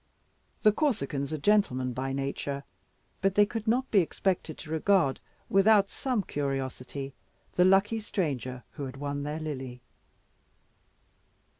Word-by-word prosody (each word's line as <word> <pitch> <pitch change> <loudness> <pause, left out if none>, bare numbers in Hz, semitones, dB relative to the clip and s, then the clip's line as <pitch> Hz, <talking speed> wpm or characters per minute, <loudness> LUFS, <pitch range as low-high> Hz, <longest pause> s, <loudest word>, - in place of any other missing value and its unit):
The 215 - +7
Corsicans 180 - -1
are 155 - -1
gentlemen 140 -8 +2
by 130 +2 -2
nature, 140 +1 -3 0.6
but 195 0 +2
they 205 - +6
could 220 +1 -5
not 250 +4 +1
be 205 - +6
expected 175 -2 -1
to 155 - -9
regard 160 -3 +3 0.3
without 200 0 +5
some 250 -6 -1
curiosity 135 -2 -3 0.4
the 180 - +4
lucky 195 +4 +4
stranger 130 - -3
who 140 - -5
had 130 0 -7
won 145 0 -3
their 150 +2 -3
Lily. 130 -5 -5
155 Hz, 130 wpm, -29 LUFS, 135-200 Hz, 0.6 s, The